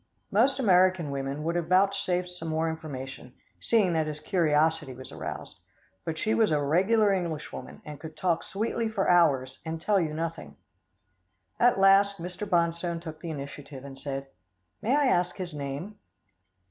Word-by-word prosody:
Most 255 +7 +3
American 185 - +3
women 140 +2 -3
would 165 +2 0
have 170 -2 -1
vouchsafed 185 -1 +2
some 180 -2 -7
more 160 +1 0
information, 135 -5 -8 0.2
seeing 205 -7 +2
that 160 -1 +1
his 150 0 -4
curiosity 155 -3 +1
was 130 +1 -9
aroused, - - -7 0.5
but 160 -1 -3
she 215 +7 0
was 220 -2 +3
a 150 - +3
regular 195 +8 +3
Englishwoman, 170 -5 -5
and 150 -1 -8
could 160 -1 -9
talk 175 -3 +1
sweetly 225 +3 -2
for 205 -3 -1
hours, 135 -7 +3
and 160 0 -4
tell 200 +4 +2
you 155 -2 -2
nothing. 160 - -4 1.0
At 240 -4 +4
last, 195 +1 +5
Mr. 180 +4 -6
Bonstone 170 0 +1
took 160 -2 -8
the 170 - -5
initiative, 140 -2 -7
and 135 -1 -9
said, 135 0 -5 0.6
"May 230 +6 +2
I 295 -1 +3
ask 180 -7 +2
his 180 -4 -6
name?" 145 +9 -5
165 Hz, 160 wpm, -28 LUFS, 150-195 Hz, 1.0 s, last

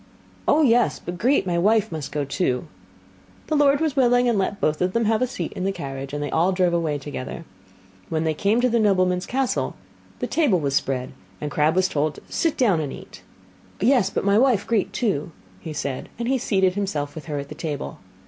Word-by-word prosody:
'Oh, 310 +1 +4
yes, 240 -3 +3
but 175 0 -7
Grete, 260 +2 +3
my 175 -2 0
wife, 215 +3 +3
must 155 -4 -5
go 145 -1 -1
too.' 140 -2 -1 0.8
The 310 - -1
lord 285 -1 +4
was 315 -3 0
willing, 245 -2 +4
and 235 - +2
let 200 0 -1
both 155 -3 0
of 180 +1 +1
them 230 -1 +1
have 220 +1 +2
a 255 - +2
seat 175 -9 -4
in 185 - -4
the 195 - +1
carriage, 135 -5 -6
and 145 0 -3
they 145 - -4
all 170 +4 +2
drove 180 -2 +2
away 160 -4 0
together. 145 +3 -6 0.6
When 160 0 0
they 160 -1 +1
came 205 +9 +1
to 250 - +4
the 235 0 +2
nobleman's 185 -3 +2
castle, 265 0 -1 0.4
the - - -2
table 285 - +2
was 140 -3 -1
spread, 130 -2 -1 0.3
and 150 - -4
Crabb 155 +3 +2
was 185 0 +3
told 150 -3 -1
to - - -12
sit 330 -3 0
down 210 - +3
and 145 -3 -3
eat. - - -11 0.6
'Yes, 235 -3 +3
but 195 - -2
my 200 +1 +4
wife, 245 -6 +3
Grete, 225 -4 0
too,' 185 - -1 0.4
said 140 -3 -3
he, - - -19
and 235 0 -3
he 265 0 +1
seated 190 -5 +2
himself 155 -8 -2
with 155 - -8
her 150 -2 -4
at 140 0 -5
the - - -6
table. 150 -4 -5
185 Hz, 220 wpm, -23 LUFS, 150-235 Hz, 0.8 s, Oh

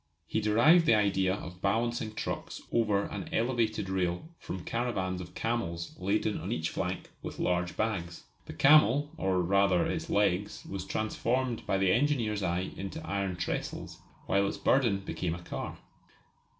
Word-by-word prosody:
He 110 - -1
derived 125 +11 +5
the 115 - +6
idea 95 -3 +2
of 90 -2 -9
balancing 115 0 0
trucks - - -4
over 105 -4 +2
an 100 -2 -5
elevated 115 -4 0
rail 95 - -1
from 95 - -6
caravans 95 -7 -1
of 90 -1 -10
camels 85 -8 -2
laden 100 +2 0
on 90 +7 -5
each 80 -8 -1
flank 95 -1 -3
with - - -6
large 90 0 0
bags. 90 -6 -2 0.2
The - - -6
camel, 145 0 +5
or 95 - +1
rather 100 0 +3
its - - -3
legs, 100 -1 +1
was 95 -1 -5
transformed 115 +4 -1
by 95 - +2
the 95 -1 +3
engineer's 115 -6 +1
eye 90 0 -1
into 155 +12 -6
iron 100 -2 -1
trestles, 85 -1 -4 0.3
while 100 0 +2
its - - -3
burden 115 -8 +2
became 85 -2 -3
a 85 - -10
car. - - -5
100 Hz, 155 wpm, -30 LUFS, 90-115 Hz, 0.3 s, the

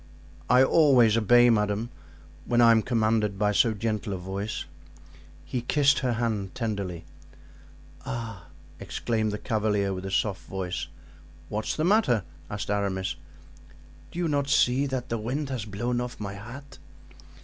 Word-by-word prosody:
"I 125 +2 +6
always 130 -7 +5
obey, 120 +2 +5
madame, 105 +2 0 0.5
when 120 - +1
I 115 -1 +7
am 115 -1 +5
commanded 110 -3 +1
by 105 +1 +2
so 110 +3 +3
gentle 105 -1 -2
a - - -3
voice." 95 +4 -4 0.8
He 120 +9 -3
kissed 140 +2 +3
her 125 -2 0
hand 110 -5 -2
tenderly. 100 -8 -3 1.0
"Ah!" 110 -8 -6 0.3
exclaimed 110 -2 -2
the 105 - -3
cavalier 105 -3 0
with 95 +1 -5
a - - -4
soft 95 0 0
voice. 95 -2 -4 0.6
"What's 110 +1 -2
the 155 - -1
matter?" 180 - +3 0.3
asked 105 -1 -4
Aramis. 95 -3 -1 0.9
"Do - - -11
you 175 -1 0
not 140 -2 0
see 135 -1 +3
that 130 -1 -4
the 115 - -1
wind 135 +6 -3
has 125 -6 -3
blown 120 +4 -2
off 125 0 -6
my 100 -2 -5
hat?" 125 +8 -10
110 Hz, 150 wpm, -27 LUFS, 100-125 Hz, 1.0 s, I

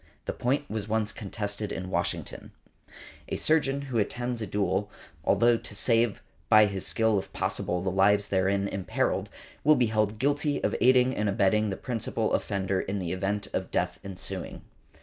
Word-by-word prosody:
The - - -2
point 135 +4 -1
was 105 -1 -4
once 110 -1 0
contested 105 0 -4
in 95 0 -5
Washington. 85 -1 -3 0.4
|144| - - -23 0.4
A - - -1
surgeon 140 -3 +2
who 130 -5 -1
attends 120 +3 -2
a 110 - -3
duel, 100 +1 0 0.3
although 120 +6 +4
to 105 - -9
save 115 0 +2 0.3
by 110 0 +8
his 100 -2 -2
skill 110 -3 +3
if - - -9
possible 90 0 -1
the 95 - 0
lives 100 +2 +3
therein 100 +1 +1
imperilled, 95 -3 -1 0.3
will 155 +1 +6
be 125 -3 +3
held 105 0 +1
guilty 145 +3 +1
of - - +1
aiding 130 0 +5
and 105 0 0
abetting 105 +2 +2
the 95 - -3
principal 115 -2 -2
offender 95 -2 0
in 100 +1 -3
the 90 -3 -3
event 100 +2 -2
of - - -2
death - - -1
ensuing. 95 -1 -6
105 Hz, 170 wpm, -28 LUFS, 95-120 Hz, 0.4 s, by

